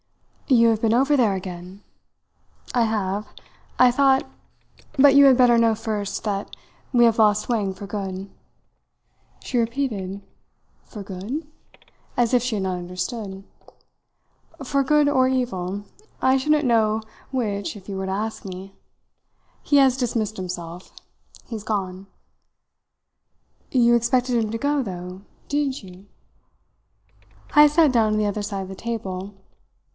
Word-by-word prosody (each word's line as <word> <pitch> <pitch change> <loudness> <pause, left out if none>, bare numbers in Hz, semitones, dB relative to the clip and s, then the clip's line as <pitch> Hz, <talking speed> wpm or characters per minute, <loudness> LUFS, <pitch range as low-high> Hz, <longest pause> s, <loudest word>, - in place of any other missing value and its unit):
"You 235 -4 +5
have 220 -1 0
been 225 0 +2
over 275 +4 +3
there 225 -7 +3
again?" 185 +1 -8 0.9
"I 245 - +2
have. 210 -2 -1 0.5
I 250 - +7
thought 270 +1 +3 0.7
but 275 0 +6
you 280 0 +8
had 265 -2 +6
better 245 -2 +5
know 230 -1 +3
first 215 -1 -4
that 200 -1 -3 0.4
we 240 -2 +5
have 230 -1 +2
lost 210 -1 +3
Wang 210 -5 0
for 200 +2 -9
good." 195 -1 -5 1.1
She 250 - -1
repeated 225 -6 -2 0.6
"For 210 -4 -9
good?" 205 - -6 0.7
as 240 0 +2
if 250 - +4
she 245 -2 -2
had 195 - -2
not 185 -1 -2
understood. 190 +3 -5 1.2
"For 275 +1 +1
good 295 +2 +3
or 260 -3 +3
evil 205 -7 -2 0.4
I 260 0 +4
shouldn't 300 +2 +2
know 220 -2 +2 0.3
which 210 -6 -2
if 195 - -15
you 200 - -5
were 190 0 -3
to - - -2
ask 215 +3 -3
me. 190 0 -8 0.9
He 290 - +2
has 265 -2 +5
dismissed 225 -4 -2
himself. 180 -2 -7 0.5
He's 220 -3 -7
gone." 195 -3 -3 1.6
"You 240 -2 +4
expected 240 0 +1
him 215 - -4
to 230 - -2
go, 285 +3 0
though, 180 -3 -7 0.3
didn't 285 -4 -1
you?" 185 +1 -14 1.5
Heyst 295 0 +6
sat 315 -5 +5
down 220 -3 +3
on 215 - +1
the 210 - +1
other 205 0 -2
side 200 -2 -4
of - - -8
the 190 - -7
table. 200 -3 -5
220 Hz, 140 wpm, -23 LUFS, 195-255 Hz, 1.6 s, you